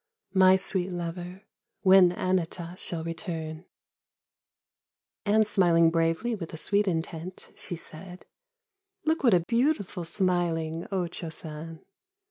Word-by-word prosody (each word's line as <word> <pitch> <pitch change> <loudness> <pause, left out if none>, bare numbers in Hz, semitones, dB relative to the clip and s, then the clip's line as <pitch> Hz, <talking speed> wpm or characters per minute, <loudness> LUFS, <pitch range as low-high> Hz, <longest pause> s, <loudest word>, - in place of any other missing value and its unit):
My 190 -1 +7
sweet 190 -1 -1
lover, 175 +2 -5 0.4
when 190 -1 +7
Anata. 180 -1 -2
shall 170 -3 -4
return! 165 -1 -5 0.8
" - - -67
And 215 +1 +4
smiling 170 -5 +4
bravely 165 +8 +1
with 175 -7 -5
a - - -7
sweet 205 +5 +1
intent, 165 +1 -4
she 175 - -7
said: 180 +3 -9 0.4
" 395 -3 -49
Look 320 0 +1
what 235 -7 +6
a 175 - +3
beautiful 230 - 0
smiling 170 -2 -1
O 185 -2 0
Cho 170 -1 -6
San 160 +1 -8
180 Hz, 125 wpm, -28 LUFS, 165-195 Hz, 0.8 s, My